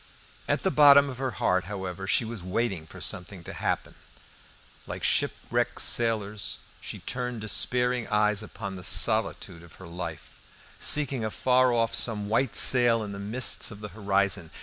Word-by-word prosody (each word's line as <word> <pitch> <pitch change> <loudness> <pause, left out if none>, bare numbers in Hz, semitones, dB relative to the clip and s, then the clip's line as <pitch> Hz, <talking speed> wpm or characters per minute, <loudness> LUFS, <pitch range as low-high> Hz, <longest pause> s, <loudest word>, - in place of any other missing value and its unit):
At - - -1
the 190 - +1
bottom 140 -2 +6
of 125 - -10
her 135 -1 -1
heart, 90 0 +1
however, 95 -1 -6
she 115 - +2
was 110 -3 -7
waiting 95 -3 -3
for - - -13
something 90 0 -3
to - - -8
happen. - - -3 0.9
Like - - -7
shipwrecked - - 0
sailors, 110 -3 0 0.2
she - - -7
turned 125 -3 -4
despairing 125 +3 0
eyes 105 -1 +1
upon 100 -2 -8
the 90 - -10
solitude 85 - 0
of 85 -1 -16
her 95 - -13
life, 85 -2 -8 0.4
seeking 140 -5 +3
afar 125 +3 +2
off 115 -1 0
some 105 -3 0
white 115 +2 0
sail 120 -3 +5
in 105 - -7
the 100 - -7
mists 110 +6 +1
of 105 - -10
the 105 0 -8
horizon. 100 -5 -1
105 Hz, 160 wpm, -26 LUFS, 95-125 Hz, 0.9 s, bottom